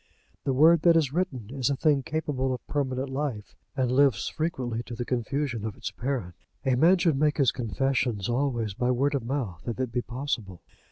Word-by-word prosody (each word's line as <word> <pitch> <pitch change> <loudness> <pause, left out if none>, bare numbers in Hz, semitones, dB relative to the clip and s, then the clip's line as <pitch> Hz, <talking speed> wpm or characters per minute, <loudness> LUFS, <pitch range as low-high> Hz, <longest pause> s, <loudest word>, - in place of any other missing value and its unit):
The 135 - +1
word 160 +4 +6
that 170 0 +6
is 145 -4 +1
written 135 - -2
is 130 -2 0
a 140 - +1
thing 145 -1 +2
capable 135 -3 -1
of 125 - -12
permanent 135 -2 -1
life, 130 -6 -4 0.2
and 130 -2 +1
lives 130 -7 +3
frequently 125 -8 -2
to 120 - -6
the 120 +1 -4
confusion 125 -1 -2
of 110 -2 -4
its - - -5
parent. 120 -9 -3 0.3
A 130 - +3
man 165 +9 +5
should 165 -6 +2
make 150 0 +2
his 135 -5 +4
confessions 125 -3 -1
always 120 -4 0
by 125 +5 -1
word 135 +4 +2
of 135 -4 -1
mouth 115 -9 -3
if 120 +1 -3
it 130 -2 -1
be 125 - 0
possible. 120 - -4
130 Hz, 200 wpm, -27 LUFS, 120-145 Hz, 0.3 s, word